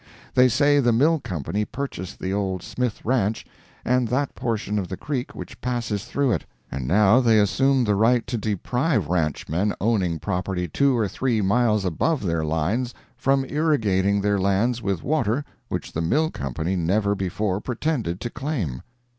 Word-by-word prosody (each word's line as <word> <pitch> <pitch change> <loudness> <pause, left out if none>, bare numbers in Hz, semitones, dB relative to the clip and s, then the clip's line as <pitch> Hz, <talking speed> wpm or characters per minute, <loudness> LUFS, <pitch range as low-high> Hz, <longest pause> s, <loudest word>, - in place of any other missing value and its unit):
They 125 0 +6
say 145 +3 +4
the 120 -3 +3
mill 150 +8 +3
company 95 - -3
purchased 105 -8 -5
the 95 +1 -3
old 95 -3 -2
Smith 125 -3 -3
ranch 110 -3 0 0.4
and 125 -1 +2
that 135 +4 -1
portion 105 -3 -2
of 95 - -3
the 95 - -5
creek 135 -4 -4
which - - -9
passes 115 -4 -2
through 140 +1 0
it, - - 0 0.3
and 65 -2 -4
now 105 +5 +5
they 115 -4 +4
assume 130 +6 +3
the 105 -3 +2
right 115 +4 +3
to 125 - -3
deprive 110 - 0
ranchmen 85 +3 0
owning 95 -6 +1
property 90 +1 -2
two 135 - +2
or 110 -3 +1
three 120 +2 0
miles 105 0 +2
above 105 - 0
their 85 -4 0
lines 85 +11 -1 0.2
from 135 +2 +1
irrigating 105 -11 +1
their 100 0 +1
lands 100 +6 +1
with 95 -6 -2
water 140 -2 0 0.2
which - - -4
the 80 - -2
mill 150 - +1
company 75 +7 -3
never 100 +4 +1
before 95 +1 -2
pretended 120 - -2
to 120 - -4
claim. 120 - -3
105 Hz, 165 wpm, -24 LUFS, 95-125 Hz, 0.4 s, They